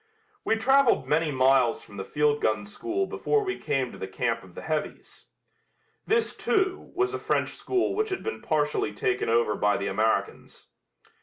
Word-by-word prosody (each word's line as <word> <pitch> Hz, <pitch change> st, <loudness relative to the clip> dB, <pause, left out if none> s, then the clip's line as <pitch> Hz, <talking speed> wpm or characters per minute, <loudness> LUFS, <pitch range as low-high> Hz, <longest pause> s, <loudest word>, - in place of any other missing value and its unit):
We 225 Hz, -, +2 dB
traveled 265 Hz, +3 st, +3 dB
many 155 Hz, +1 st, +2 dB
miles 130 Hz, -3 st, +3 dB
from 100 Hz, -, -13 dB
the 95 Hz, -, -3 dB
field 150 Hz, +5 st, +1 dB
gun 110 Hz, -1 st, 0 dB
school 360 Hz, -, -2 dB
before 435 Hz, +2 st, 0 dB
we 380 Hz, -1 st, -3 dB
came 135 Hz, -3 st, -1 dB
to -, -, -12 dB
the 95 Hz, -, -4 dB
camp 115 Hz, +3 st, -1 dB
of 95 Hz, -4 st, -16 dB
the -, -, -8 dB
heavies. 155 Hz, -1 st, -4 dB, 0.8 s
This, 455 Hz, +1 st, +1 dB
too, 385 Hz, -2 st, 0 dB
was 380 Hz, +1 st, +1 dB
a -, -, -2 dB
French -, -, 0 dB
school 375 Hz, -1 st, -1 dB
which 435 Hz, +2 st, 0 dB
had 380 Hz, -, -3 dB
been 445 Hz, -, -4 dB
partially 150 Hz, -8 st, 0 dB
taken 125 Hz, +4 st, -1 dB
over 115 Hz, -2 st, +2 dB
by 105 Hz, 0 st, +1 dB
the 100 Hz, -, -3 dB
Americans. 110 Hz, +3 st, -2 dB
150 Hz, 175 wpm, -27 LUFS, -, 0.8 s, traveled